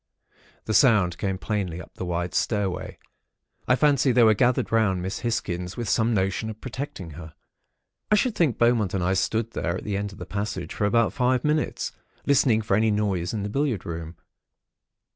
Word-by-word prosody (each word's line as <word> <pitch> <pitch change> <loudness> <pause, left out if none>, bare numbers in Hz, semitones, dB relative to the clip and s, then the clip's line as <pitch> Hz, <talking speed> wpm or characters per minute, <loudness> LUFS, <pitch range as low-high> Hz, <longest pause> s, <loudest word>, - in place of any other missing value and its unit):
The 110 - -2
sound 105 -6 +4
came 95 -2 -1
plainly 95 -4 -3
up 90 - -11
the - - -6
wide 85 0 -2
stair 105 -4 0
way. 90 - -7 0.7
I 125 - +5
fancy 140 -1 +3
they 120 0 +5
were 110 -1 +6
gathered 120 +3 +1
round 100 -5 +2
Miss 95 +2 -3
Hisgins, 95 -6 -3
with 120 -2 -3
some 115 +3 +2
notion 95 +1 0
of 110 0 -8
protecting 130 - -6
her. 80 0 -10 0.7
"I 210 - +5
should 235 +3 +1
think 160 - +1
Beaumont 115 -5 +2
and 95 - -1
I 95 +2 +2
stood 110 +4 0
there, - - -2
at - - -8
the 100 -2 -2
end 100 0 -3
of 95 - -13
the - - -7
passage, 100 -4 -4
for 105 - -1
about 115 +2 +2
five 125 -1 +1
minutes, 150 0 0 0.3
listening 120 -5 +3
for 105 -2 +1
any 110 +2 +3
noise 100 -5 0
in 105 -3 -3
the - - -2
billiard 130 - -1
room. 85 0 -6
105 Hz, 195 wpm, -25 LUFS, 95-120 Hz, 0.7 s, were